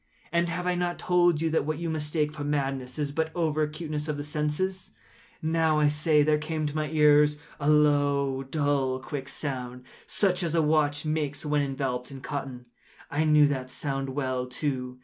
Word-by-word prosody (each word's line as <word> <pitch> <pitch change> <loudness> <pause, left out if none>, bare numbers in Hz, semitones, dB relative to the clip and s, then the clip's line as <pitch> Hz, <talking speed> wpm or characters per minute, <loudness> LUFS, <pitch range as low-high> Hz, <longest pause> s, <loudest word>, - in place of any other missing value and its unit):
And 170 +1 +1
have 180 +2 -3
I 180 - +2
not 175 0 -1
told 175 -3 +2
you 165 - +1
that 160 - +2
what 155 +1 -2
you 170 +1 -3
mistake 150 -1 -1
for 150 -2 -5
madness 135 -3 -2
is 145 -2 -1
but 160 +2 -1
over 155 -3 0
acuteness 150 0 -3
of 150 -1 -2
the 145 - -4
sense?—now, 160 0 -2
I 150 -1 +4
say, 150 0 +3
there 150 0 +3
came 155 0 -2
to 145 0 -3
my 155 -1 -1
ears 150 -1 +5 0.2
a 145 0 +1
low, 145 -2 +3
dull, 135 -2 0
quick 135 0 -6
sound, 125 -4 -5 0.2
such 185 -3 +1
as 170 -2 -1
a 165 - +4
watch 150 -1 +2
makes 150 -1 -2
when 150 0 +2
enveloped 135 -3 -2
in 135 -1 -9
cotton. 130 -2 -5 0.5
I 150 +2 +1
knew 150 -1 +6
that 130 -2 -3
sound 135 0 -3
well, 130 -2 -2
too. 125 -1 -3
150 Hz, 185 wpm, -27 LUFS, 140-155 Hz, 0.5 s, knew